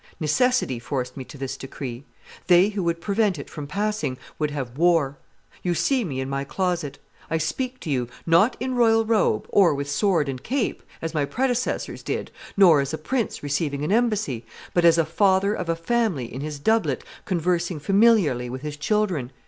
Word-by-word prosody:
Necessity 165 - +1
forced 125 +1 -4
me 135 - -6
to 140 - -12
this 135 0 -4
decree. 135 -1 -7 0.4
They 180 +2 +6
who 205 -2 -3
would 170 0 -1
prevent 200 -1 +1
it 140 - -8
from 145 -2 -6
passing 205 -6 -2 0.2
would 150 -1 +1
have 135 -5 -5
war. 160 -4 +2 0.4
You 175 -1 0
see 260 - +1
me 140 -9 -4
in 130 - -2
my 135 0 -2
closet. 170 -2 -2 0.3
I 160 - +1
speak 255 - -3
to - - -6
you, 125 -3 0 0.2
not 170 +9 +4
in 255 +2 -2
royal 225 -2 +4
robe, 215 - +2
or 180 -7 +4
with 140 0 -3
sword 165 0 +1
and 130 -2 -4
cape, 255 - -1 0.2
as 165 0 -3
my 150 -3 +1
predecessors 250 - -1
did, - - -4 0.3
nor 170 -7 +7
as 140 +3 -2
a - - -6
prince 235 - -2
receiving 145 0 -1
an 150 - -1
embassy, 215 - +1 0.3
but 175 -1 +3
as 170 0 +6
a 165 - +3
father 190 +4 +2
of 180 -5 -4
a 165 - +2
family 180 - 0
in 130 - -5
his 150 0 -4
doublet 220 +10 +1 0.2
conversing 175 -3 0
familiarly 195 - +3
with 130 +3 -6
his 150 -1 -5
children. 175 - 0
165 Hz, 190 wpm, -24 LUFS, 140-210 Hz, 0.4 s, nor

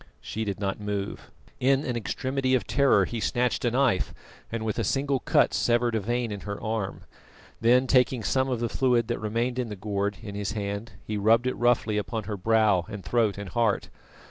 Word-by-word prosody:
She 110 - -4
did 100 -2 -3
not 100 0 -2
move. 105 -1 -4 0.3
In 135 +2 +2
an 125 - -2
extremity 130 +3 0
of 125 - 0
terror 140 -1 +4
he 120 - -4
snatched 125 +3 0
a - - +4
knife, 125 -5 +1 0.4
and 115 -1 -3
with 110 +1 -1
a - - +1
single 135 +5 0
cut - - +3
severed 120 0 +2
a 110 - +1
vein 120 +2 -1
in 100 - -4
her 100 0 -6
arm, 110 -3 -3 0.6
then 125 +3 +4
taking 125 -2 +3
some 130 +6 +1
of 125 -3 -1
the 120 - +1
fluid 120 -1 +2
that 120 - -1
remained 115 +4 -1
in 120 -2 -2
the 105 - -5
gourd 100 0 -2
in 100 -3 -6
his 100 0 -3
hand, 100 +1 -4
he 105 - -3
rubbed 115 +4 +4
it 130 - +1
roughly 115 -3 +2
upon 110 +1 -3
her 105 +1 -4
brow 105 -2 +3
and 105 -3 -7
throat 115 -5 +1
and 100 -2 -6
heart. 115 0 0
115 Hz, 205 wpm, -27 LUFS, 105-125 Hz, 0.6 s, terror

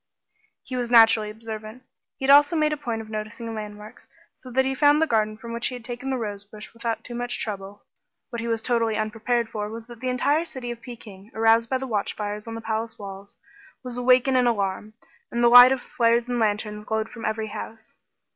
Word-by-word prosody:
He 255 - -6
was 245 -1 -2
naturally 225 -2 +6
observant; 220 +2 -8 0.3
he 270 - -4
had 275 - +5
also 290 +4 +6
made 305 -1 +2
a - - -3
point 235 -6 -4
of 215 - -14
noticing 215 +2 -5
landmarks, 210 +1 -9 0.3
so 255 - -12
that 265 +2 +2
he 265 - 0
found 290 +2 +4
the 320 - +4
garden 215 -6 0
from 230 +1 -8
which 235 0 -1
he 255 - -4
had 240 -2 -10
taken 245 +2 -5
the 265 - 0
rosebush 210 -1 -7
without 230 -1 -3
too 240 - -8
much 245 0 -3
trouble. 200 -1 -5 0.5
What 235 - -4
he 230 - -4
was 225 -1 -1
totally 230 -3 +1
unprepared 225 +2 -1
for 210 -1 -4
was 225 +1 -8
that 240 -1 -12
the 255 +1 -2
entire 285 +5 +1
city 255 -7 -6
of 235 -1 -8
Peking, 220 -4 -11
aroused 225 +1 +3
by 260 - +1
the 265 - -5
watchfires 210 -2 -3
on 225 - -5
the 225 - -6
palace 225 0 -3
walls, 200 0 -10 0.5
was 250 -1 -6
awake 250 +1 +4
and 265 - +2
in 250 -1 +4
alarm, 210 -1 -1 0.4
and 235 0 0
the 240 - +7
light 245 +1 +10
of 265 -2 -1
flares 235 0 +1
and 245 -1 -1
lanterns 210 -1 -1
glowed 220 +1 -2
from 230 - -10
every 220 0 -2
house. 220 +1 -8
230 Hz, 220 wpm, -24 LUFS, 215-245 Hz, 0.5 s, light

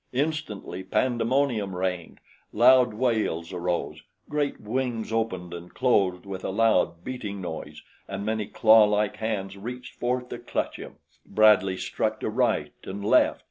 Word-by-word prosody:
Instantly 140 -9 -3
pandemonium 120 -1 0
reigned. 90 -2 -3 0.3
Loud 125 +1 +6
wails 110 -8 0
arose, 90 -1 -2 0.3
great 145 -1 -1
wings 115 0 -3
opened 95 -6 -2
and 85 +1 -9
closed 100 -8 +2
with 95 -1 -6
a - - -2
loud, 95 -5 +2
beating 105 -6 -5
noise 90 -4 -7 0.2
and 100 +1 -5
many 110 -1 -1
clawlike 105 -2 +4
hands 100 -3 -3
reached 125 +5 -7
forth 125 +1 -1
to - - -6
clutch - - -3
him. - - -10 0.3
Bradley 100 -3 +4
struck 110 +4 -2
to - - -1
right 125 +2 0
and 100 +1 -6
left. - - +4
110 Hz, 140 wpm, -26 LUFS, 95-125 Hz, 0.3 s, Loud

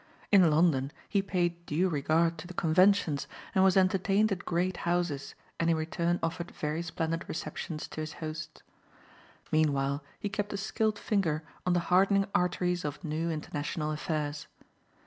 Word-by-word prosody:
In 190 -5 +7
London 150 -4 +3 0.2
he 200 - +2
paid 175 -3 -1
due 170 +6 +2
regard 165 +1 +1
to 175 - -8
the 180 - -10
conventions 170 -3 +3 0.3
and 190 - +4
was 190 0 +5
entertained 195 +3 +3
at 180 -2 -3
great 180 +1 0
houses 175 -5 -1 0.2
and 165 - +2
in 165 - +4
return 170 +2 0
offered 170 +1 -2
very 150 +2 -3
splendid 165 0 -2
receptions 160 -1 -4
to 155 - -5
his 155 0 -5
hosts. 155 -1 -7 0.9
Meanwhile 140 -2 +1 0.2
he - - -2
kept 205 +1 -3
a - - -2
skilled 215 +1 0
finger 165 -9 0 0.2
on 180 - +4
the 175 - +3
hardening 195 +1 +5
arteries 180 0 +1
of 150 +3 -5
new 160 +1 -1
international 150 0 -3
affairs. 150 -1 -3
170 Hz, 155 wpm, -30 LUFS, 155-185 Hz, 0.9 s, In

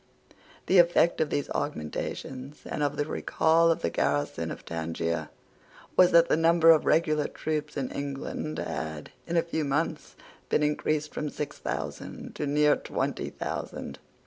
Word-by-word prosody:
The 185 - +5
effect 170 -1 +4
of 155 - +1
these 145 - -1
augmentations, 135 - -4
and - - -4
of 145 0 0
the 145 - 0
recall 165 +2 +2
of 165 - +1
the 85 - 0
garrison 75 0 0
of - - -8
Tangier, 85 -1 -3 0.7
was 180 -1 +7
that 170 -1 +6
the - - +3
number 165 +1 +6
of 160 - +4
regular 155 -2 +3
troops 150 -1 -3
in 135 -2 -2
England 140 +2 -4
had, 80 -1 -4 0.2
in 170 0 0
a 165 - +4
few 160 -2 -2
months, 150 +2 -2 0.3
been 150 - +2
increased 150 0 0
from 150 - -3
six 150 0 -5
thousand - - -5
to 150 - -3
near 150 +1 +4
twenty - - -3
thousand. - - -5
150 Hz, 155 wpm, -28 LUFS, 135-160 Hz, 0.7 s, was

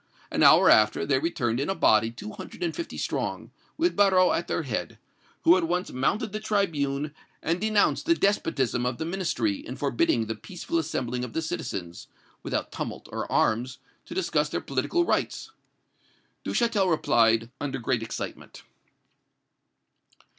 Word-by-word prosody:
An - - 0
hour - - +7
after, 105 0 +4
they 135 -2 +2
returned 125 -7 -1
in 140 - -1
a 195 - 0
body 110 - +4
two 115 -2 -8
hundred 175 - -8
and 170 -2 -1
fifty 335 - -5
strong, - - -3 0.3
with 345 +2 +1
Barrot 190 -3 +4
at 170 - -2
their 165 - -1
head, 120 -7 -4 0.5
who 170 - +7
at 170 -3 0
once 180 +2 -1
mounted 205 - 0
the 215 - -3
tribune 150 -9 -1 0.3
and 170 +3 0
denounced 215 +5 +2
the 335 - +5
despotism 145 - 0
of 125 -1 -1
the 160 - -3
Ministry 160 - -1
in 125 - -8
forbidding 120 -4 +1
the 110 - -3
peaceful 170 - -4
assembling 125 -6 -2
of 125 - -6
the 160 - -1
citizens, 90 - -5 0.3
without - - -3
tumult - - -6
or - - -4
arms, 120 +4 +1 0.3
to 330 - -9
discuss 380 - +1
their - - -2
political 345 0 0
rights. 440 - -1 0.9
Duchatel 215 -6 +1
replied, 115 -7 +3
under 135 -2 -2
great 120 -1 -1
excitement. 115 -1 -7
150 Hz, 155 wpm, -26 LUFS, 120-190 Hz, 0.9 s, hour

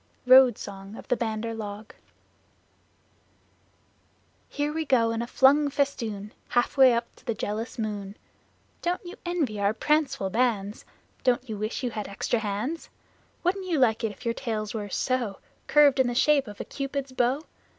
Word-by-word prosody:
Road 255 -2 +7
Song 195 +1 -8
of - - -11
the - - +3
Bandar 230 -1 -2
Log 210 -1 -7 2.6
Here 295 +1 -2
we 320 0 -1
go 240 -6 +3
in 230 0 -2
a 235 - -4
flung 285 +4 +4
festoon, 230 -8 -2 0.2
Half 245 - +1
way 265 -2 +7
up 235 0 -2
to - - -20
the 230 -4 -1
jealous 215 +3 -4
moon! 205 -2 -4 0.6
Don't 355 +1 -2
you 350 - -7
envy 295 -12 -1
our 200 +2 +1
pranceful 275 -8 +1
bands? 220 -3 0 0.4
Don't 250 0 +2
you 220 - -4
wish 215 +5 -3
you 245 - -1
had 210 -2 -4
extra 210 +4 -1
hands? 220 +10 -3 0.5
Wouldn't 375 +2 0
you 335 -4 +1
like 230 -4 +3
if 220 +2 -4
your 230 - +1
tails 215 -3 -3
were 210 -2 -4
so 240 -2 -1 0.3
Curved 285 -2 +5
in 260 - +4
the 245 - -2
shape 285 0 +3
of 205 -1 -10
a - - -4
Cupid's 275 -1 -4
bow? 255 +3 +1
240 Hz, 165 wpm, -27 LUFS, 215-275 Hz, 2.6 s, Road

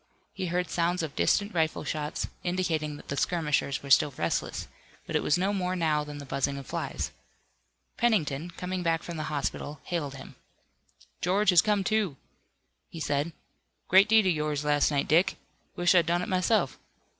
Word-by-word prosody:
He 190 -2 -3
heard 180 +1 0
sounds 175 0 +1
of 150 -3 -5
distant 205 0 +2
rifle 160 -2 0
shots, 150 0 -3 0.2
indicating 165 -5 -1
that - - -14
the 140 - -2
skirmishers 150 -3 0
were 140 - -6
still 135 0 +5
restless, 85 - -2 0.4
but - - -5
it - - +3
was 150 - +2
no 195 +3 +1
more 185 -2 -1
now 155 -4 +1
than 150 0 -8
the 145 - -8
buzzing 140 +1 -1
of 140 - -7
flies. - - -3 0.9
Pennington, 175 -9 +1
coming 180 +1 -4
back 165 -2 0
from 170 -2 -6
the 155 - -3
hospital, 145 0 -3
hailed 150 -6 -3
him. 135 - -10 0.9
"George 195 +2 +3
has 175 -1 +7
come 210 -2 +1
to," 195 -7 0 0.7
he 165 - -8
said. 145 +1 -1 0.6
"Great 195 +3 +6
deed 220 -2 +6
of 185 - +3
yours 150 -1 -2
last 145 -1 +3
night, 140 -2 0
Dick. 175 +5 +3 0.4
Wish 175 +1 +3
I'd 175 -3 +4
done 175 +1 +1
it - - -5
myself. 185 +4 +1
165 Hz, 180 wpm, -28 LUFS, 150-180 Hz, 0.9 s, has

